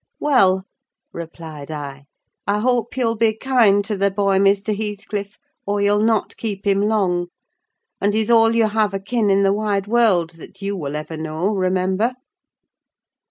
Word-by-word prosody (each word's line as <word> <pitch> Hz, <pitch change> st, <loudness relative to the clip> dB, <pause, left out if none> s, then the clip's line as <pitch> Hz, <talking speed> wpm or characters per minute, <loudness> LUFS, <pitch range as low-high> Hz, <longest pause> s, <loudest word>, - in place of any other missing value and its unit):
"Well," 190 Hz, -10 st, +3 dB, 0.5 s
replied 160 Hz, -3 st, -9 dB
I, 140 Hz, -2 st, -7 dB, 0.4 s
"I 200 Hz, +1 st, +2 dB
hope 240 Hz, +1 st, 0 dB
you'll 235 Hz, -3 st, +1 dB
be 220 Hz, -1 st, +1 dB
kind 220 Hz, -6 st, +3 dB
to 215 Hz, 0 st, -2 dB
the 200 Hz, 0 st, +1 dB
boy, 195 Hz, 0 st, +1 dB
Mr. 200 Hz, +2 st, +2 dB
Heathcliff, 205 Hz, -1 st, -5 dB, 0.3 s
or 205 Hz, 0 st, 0 dB
you'll 205 Hz, +1 st, +2 dB
not 220 Hz, -1 st, +1 dB
keep 205 Hz, -3 st, -5 dB
him 200 Hz, 0 st, +2 dB
long; 190 Hz, -5 st, +1 dB, 0.7 s
and 205 Hz, +1 st, +1 dB
he's 220 Hz, +1 st, +1 dB
all 225 Hz, 0 st, +5 dB
you 225 Hz, -1 st, +3 dB
have 210 Hz, -2 st, 0 dB
akin 210 Hz, +2 st, -1 dB
in 195 Hz, 0 st, +3 dB
the 195 Hz, 0 st, +3 dB
wide 205 Hz, -2 st, -1 dB
world, 205 Hz, -7 st, +2 dB
that 190 Hz, +3 st, -13 dB
you 200 Hz, 0 st, -3 dB
will 150 Hz, -5 st, -4 dB
ever 155 Hz, +1 st, -5 dB
know—remember." 185 Hz, +6 st, -1 dB
200 Hz, 155 wpm, -20 LUFS, 185-220 Hz, 0.7 s, all